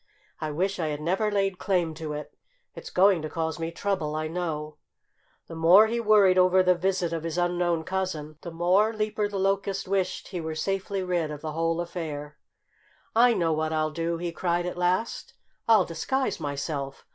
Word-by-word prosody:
"I 155 - -3
wish 185 +6 -1
I 160 - 0
had 150 -1 -3
never 190 +7 0
laid 195 -2 0
claim 175 -5 0
to 155 -1 -5
it. 150 0 -7 0.4
It's - - -9
going 185 -2 +4
to 155 - -4
cause 160 +1 -3
me 165 0 -2
trouble, 165 -5 -2
I 155 0 -2
know!" 155 -3 -4 0.7
The - - -10
more 170 +6 +7
he 230 +2 -1
worried 205 -4 +5
over 185 0 +5
the 180 0 +5
visit 180 -1 -1
of 165 - -2
his 165 +1 -4
unknown 175 -2 +1
cousin, 160 -5 -3
the 170 - -6
more 180 +6 +2
Leaper 215 -1 -1
the 205 - -4
Locust 195 0 0
wished 190 -1 -1
he 180 -3 -4
were 160 0 -4
safely 195 +3 -2
rid 175 -4 -1
of 150 -1 -7
the 155 - -4
whole 165 +1 0
affair. 155 -4 -5 0.8
"I 240 +1 +5
know 165 -2 +1
what 155 0 -1
I'll 155 -1 0
do!" 165 +1 -2
he 170 0 -3
cried 175 0 -1
at 180 - -3
last. 180 +5 -1 0.3
"I'll 215 -5 +6
disguise 260 +12 -2
myself. 140 -2 -4
175 Hz, 190 wpm, -26 LUFS, 160-190 Hz, 0.8 s, more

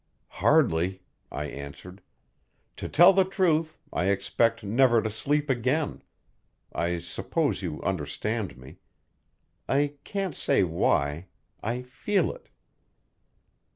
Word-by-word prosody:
"Hardly," 90 +3 +3 0.3
I 75 - -3
answered. 75 +7 -9 0.8
"To - - -5
tell 175 +4 +7
the 190 0 +5
truth, 165 -5 +1 0.2
I 90 - 0
expect 100 +4 +1
never 120 +3 +4
to 110 0 -2
sleep 145 +7 0
again 130 +4 0 0.7
I 85 +1 0
suppose 125 - -2
you 85 -5 -4
understand 95 +5 -2
me. 65 +1 -13 0.9
I 145 +1 +1
can't 195 -5 -3
say - - +2
why 80 -1 0 0.3
I 120 +4 -2
feel 135 +11 0
it." - - -16
115 Hz, 110 wpm, -27 LUFS, 90-145 Hz, 0.9 s, tell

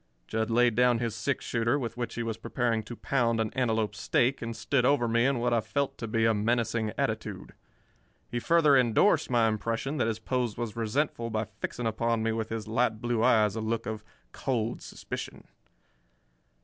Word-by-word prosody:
Jud 110 0 -1
laid 120 0 +4
down 125 +1 +4
his 115 -2 -2
six 125 +5 -2
shooter, 115 +3 +1
with 115 -5 -4
which 120 -2 -4
he 120 - -2
was 115 -1 -2
preparing 115 0 -1
to 120 - -7
pound 115 -3 0
an 110 -1 -1
antelope 110 -5 0
steak, 120 +5 +1
and 115 -1 -4
stood 135 +1 0
over 125 -2 +3
me 115 +2 +3
in 140 -2 +1
what 120 0 0
I 115 - +3
felt 140 +6 -2
to 115 - -4
be 110 +1 +1
a 115 - +4
menacing 115 0 0
attitude. - - -3 0.7
He 120 - -3
further 155 +1 +4
endorsed 130 - +3
my 120 -2 +3
impression 115 +6 -2
that 120 - +1
his 110 -2 -1
pose 120 0 -2
was 115 -3 -4
resentful 115 +1 -1
by 110 0 -1
fixing 120 - -4
upon 115 0 0
me 115 - +1
with 110 0 -3
his 110 -1 -4
light 110 -1 +1
blue 120 -1 -1
eyes 110 -5 +4
a 110 - -2
look 110 +1 -2
of 110 -1 -5 0.3
cold 120 -4 -2
suspicion. - - -7
115 Hz, 190 wpm, -28 LUFS, 110-125 Hz, 0.7 s, laid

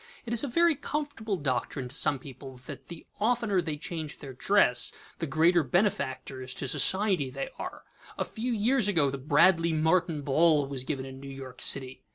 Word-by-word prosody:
It 235 - -4
is 235 - +2
a - - -1
very 335 +6 +3
comfortable 285 -8 -4
doctrine 130 -2 -2
to 125 - -8
some 145 - +3
people 130 0 -11
that - - -10
the 170 -2 -10
oftener 220 -3 +1
they 155 -3 -4
change 160 -1 -6
their 135 -2 -9
dress, 125 -3 +3 0.3
the 165 - -3
greater 165 +5 +3
benefactors 135 - -2
to 135 - -4
society 190 -4 +3
they 135 +1 -5
are. - - -7 0.3
A - - -1
few 240 +2 -4
years 235 +1 +2
ago 160 -9 +2
the 140 - -5
"Bradley 165 +4 +3
Martin 160 -1 +1
ball" 150 +1 +3
was 135 -2 -4
given 135 -3 -3
in 130 0 -10
New 140 0 -9
York 135 -2 -9
city. 130 -1 +3
155 Hz, 185 wpm, -28 LUFS, 135-200 Hz, 0.3 s, very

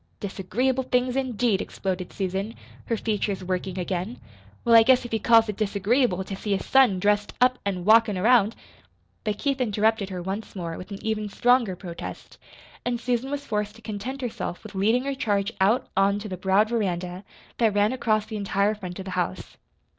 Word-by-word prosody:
"'Disagreeable 245 +7 -1
things,' 250 0 0
indeed!" 245 -6 +1
exploded 185 -2 -4
Susan, 195 +3 -3 0.3
her 230 - -1
features 205 -3 -2
working 185 0 -3
again. 185 +5 -3 0.5
"Well, 235 - +4
I 230 - +10
guess 250 +2 +4
if 240 - -7
he 225 - 0
calls 225 +1 +5
it 210 -2 -4
disagreeable 205 0 +1
to 195 - -6
see 205 +1 -2
his - - -8
son 265 -8 +5
dressed 205 +1 +1
up 255 0 +3
an' 180 -3 -2
walkin' 220 -2 +5
around 220 +1 +4 0.4
" - - -41
But 210 -2 -1
Keith 275 0 -1
interrupted 215 -2 +1
her 185 -2 -5
once 195 +5 -5
more, 170 -3 -4
with 185 - -9
an 200 - -6
even 215 -1 -1
stronger 240 -3 +2
protest, 175 -2 -8 0.4
and 240 -1 -1
Susan 245 +2 -1
was 285 0 -4
forced 210 -2 -2
to 225 - -16
content 220 +6 -5
herself 230 -7 -4
with 215 - -10
leading 220 +6 +2
her 275 0 -2
charge 205 -5 -1
out 215 +6 +3
on 195 +1 +3
to 205 +1 -6
the 190 - -4
broad 190 +4 +2
veranda 185 -5 -2 0.4
that 220 -3 +3
ran 205 +3 +3
across 215 -4 +1
the 220 -1 -5
entire 200 +1 +1
front 185 -4 -7
of 190 - -7
the 190 - -6
house. 180 - -3
210 Hz, 190 wpm, -25 LUFS, 190-235 Hz, 0.5 s, I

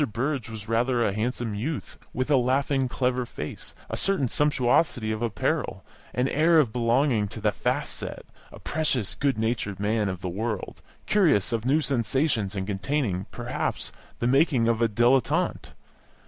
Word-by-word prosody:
Burrage 130 +1 -1
was 110 -2 -8
rather 120 +2 +2
a 100 - +1
handsome 115 +1 -2
youth, 135 +9 -4
with 130 +4 -2
a - - +6
laughing, 135 +1 +2
clever 125 0 0
face, 120 - -7
a - - -4
certain 195 -10 +1
sumptuosity 125 -4 +2
of 110 0 -3
apparel, 115 -4 -1 0.3
an 125 +1 +2
air 160 +3 +4
of 130 -9 +3
belonging 120 -2 +2
to 110 +2 -8
the 105 0 +2
"fast - - -1
set" - - -6 0.3
a - - -11
precocious, 140 -9 -1
good 140 -4 0
natured 110 -3 -1
man 105 0 +1
of 95 -1 -5
the 90 - -3
world, 105 +3 -4 0.2
curious 160 - +3
of 115 0 -1
new 145 +5 +3
sensations 120 -5 0
and 95 -1 -2
containing, 100 -1 -1
perhaps, - - -3 0.3
the - - -2
making 130 -2 +3
of 115 0 +1
a 115 - +3
dilettante. 120 +3 +2
120 Hz, 160 wpm, -26 LUFS, 110-135 Hz, 0.3 s, a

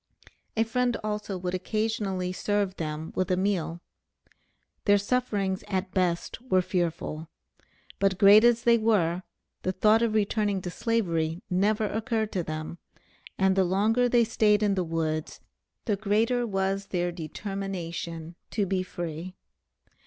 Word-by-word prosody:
A 225 - +4
friend 245 +1 0
also 210 -2 -3
would 180 0 -3
occasionally 195 -2 -1
serve 200 0 -1
them 155 0 -4
with 185 0 -1
a 180 - +2
meal. 180 -3 -1 1.0
Their 205 -1 +6
sufferings 200 -3 -1
at 190 -1 -2
best 180 +3 -1
were 185 -8 +2
fearful; 165 -3 -2 0.7
but 195 -2 +2
great 205 +3 +8
as 235 -1 +4
they 235 -1 +5
were, 185 -6 +2 0.4
the 185 - 0
thought 215 +4 +4
of 230 -2 +1
returning 205 -1 +1
to 180 - -4
Slavery 175 -6 -1
never 205 +4 +2
occurred 220 +1 -1
to 185 - -1
them, 155 +2 -5 0.6
and 190 0 +3
the 190 - +4
longer 215 +7 +2
they 240 -1 +4
stayed 215 -2 +3
in 205 -1 +3
the 185 -2 0
woods, 160 -2 -2 0.5
the 210 -4 0
greater 225 +4 +1
was 195 0 -1
their 175 -1 -1
determination 170 -2 -5 0.2
to 205 - 0
be 190 0 0
free. 175 0 -6
195 Hz, 140 wpm, -27 LUFS, 175-215 Hz, 1.0 s, great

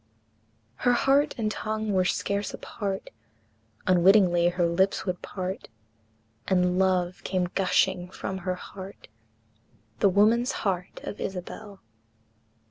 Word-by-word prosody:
Her 245 - +3
heart 275 +4 +3
and 215 -2 -1
tongue 215 0 -2
were 185 -1 +3
scarce 200 +2 -1
apart, 195 -3 -5 0.7
Unwittingly 180 -1 +5
her 175 0 0
lips 190 +3 +1
would 180 -2 -3
part, 185 0 -5 0.8
And 180 -1 +2
love 185 -1 +1
came 180 -2 -1
gushing 185 -1 +1
from 190 +1 -5
her 185 0 -2
heart, 190 - -10 0.9
The 200 - +5
woman's 220 +6 +3
heart 180 -2 -2
of - - -6
Isabel. 190 +2 -6
190 Hz, 115 wpm, -27 LUFS, 180-205 Hz, 0.9 s, Unwittingly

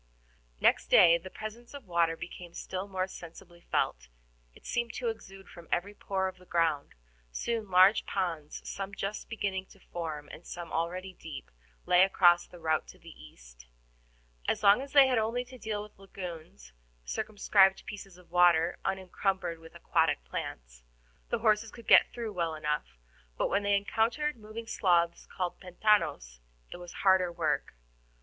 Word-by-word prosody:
Next - - +3
day 170 - +7
the 185 +3 -10
presence 225 +6 -8
of 280 -4 -10
water 170 -2 +1
became 175 0 -9
still 190 +1 -5
more 185 -1 -1
sensibly 175 -1 -12
felt; - - 0 0.5
it - - -18
seemed 235 -1 -2
to 240 -2 -1
exude 195 -3 -9
from 170 -1 -13
every 195 +4 0
pore 190 -2 -2
of 185 0 -7
the 180 - -18
ground. 160 -4 0 0.4
Soon 225 - -3
large 185 +3 +5
ponds, 165 -6 -3
some 200 0 -5
just 200 +2 -4
beginning 195 -4 -3
to 195 - -19
form, 160 -5 -6
and 165 - -11
some 175 -1 -7
already 180 +3 -2
deep, 160 - -9 0.3
lay 180 0 +5
across 175 -2 +5
the 175 - -13
route 160 -2 0
to - - -13
the - - -13
east. - - -15 0.8
As - - 0
long 200 +4 +6
as 275 0 -9
they 280 -2 +9
had 255 -3 +2
only 230 +3 -1
to 255 0 -13
deal 210 -1 -3
with 210 -2 -15
lagoons, 165 - -9 0.3
circumscribed 195 - +2
pieces 195 -3 -9
of 180 -2 -20
water 175 -1 +4
unencumbered 190 -2 -2
with 165 +1 -15
aquatic 160 -3 +1
plants, - - -7 0.5
the 235 - +1
horses 220 -1 +2
could 235 0 -13
get - - +7
through 230 -3 -5
well 170 -3 -1
enough, 150 - -3 0.4
but - - +1
when 200 - +1
they 205 0 +2
encountered 230 +9 0
moving 220 0 -8
sloughs 175 -6 +1
called 180 -2 -4
PENTANOS, 170 - +1 0.3
it - - -7
was 175 -1 -9
harder 190 -2 +5
work. 170 - -1
185 Hz, 165 wpm, -30 LUFS, 170-205 Hz, 0.8 s, they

